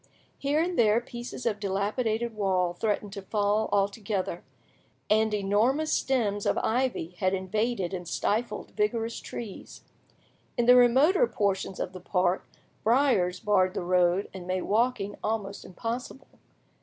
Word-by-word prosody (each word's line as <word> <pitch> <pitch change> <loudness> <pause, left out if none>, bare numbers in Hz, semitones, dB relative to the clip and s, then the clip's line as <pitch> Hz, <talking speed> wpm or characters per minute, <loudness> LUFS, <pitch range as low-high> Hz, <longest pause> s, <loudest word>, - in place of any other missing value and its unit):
Here 290 +2 +1
and 345 +2 0
there 220 -1 +5
pieces 240 0 -8
of 215 -3 0
dilapidated 215 +4 -1
wall 185 -4 +1
threatened 205 +1 -2
to 200 - -6
fall 205 +2 0
altogether, 200 -3 -1 0.7
and 220 0 +4
enormous 215 +10 +1
stems 210 -6 0
of - - +1
ivy 245 -8 0
had 185 +1 +2
invaded 195 0 -1
and 175 -2 -5
stifled 220 +7 -2
vigorous 225 +2 -1
trees; 215 -5 -8 0.7
in 240 - +2
the 250 +1 +8
remoter 270 - +5
portions 195 - -1
of 185 - -3
the 185 - -9
park 180 0 0 0.4
briers 220 -7 +3
barred 185 -1 +2
the - - -2
road 180 +2 +2
and 185 -2 -8
made 185 0 -1
walking 215 -2 0
almost 205 -2 -3
impossible. 240 +7 -6
210 Hz, 135 wpm, -28 LUFS, 190-235 Hz, 0.7 s, the